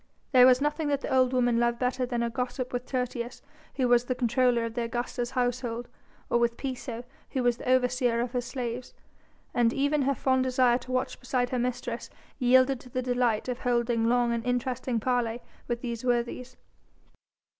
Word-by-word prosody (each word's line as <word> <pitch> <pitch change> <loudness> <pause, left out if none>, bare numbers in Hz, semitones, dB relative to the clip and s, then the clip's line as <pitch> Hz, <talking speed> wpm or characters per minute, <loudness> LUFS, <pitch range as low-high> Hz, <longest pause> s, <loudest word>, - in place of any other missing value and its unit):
There 255 -2 +8
was 255 +1 +5
nothing 295 +1 0
that 285 -1 0
the - - -3
old 255 -1 +4
woman 245 -2 +2
loved 235 0 +1
better 250 0 -1
than 240 -1 -1
a 235 - 0
gossip 250 +1 -3
with 245 0 -3
Tertius, 250 -1 -3 0.3
who 260 -2 +1
was 245 0 +4
the 255 - -1
comptroller 245 -1 +2
of 230 - -5
the 240 - -2
Augusta's 240 +1 -3
household, 245 -2 -2 0.4
or 240 - +2
with 235 0 +1
Piso, 250 -3 -5 0.3
who 260 -3 0
was 240 -1 +2
the - - -5
overseer 250 -2 +2
of 240 0 -1
her 250 -1 -1
slaves: 245 -1 -5 0.6
and 235 -1 +3
even 285 +3 +1
her 275 +1 +1
fond 260 +2 +2
desire 255 -1 +3
to 255 - -9
watch 255 0 -1
beside 250 -1 -1
her 250 - 0
mistress 245 -1 -3 0.3
yielded 255 +1 +4
to 250 - -14
the 255 +1 -2
delight 245 -3 +1
of 250 0 -3
holding 235 -2 +1
long 240 -1 +2
and 230 -1 -2
interesting 250 0 -1
parley 240 -1 0 0.3
with 240 -1 -2
these 235 -2 -4
worthies. 245 0 -1
245 Hz, 190 wpm, -28 LUFS, 240-255 Hz, 0.6 s, There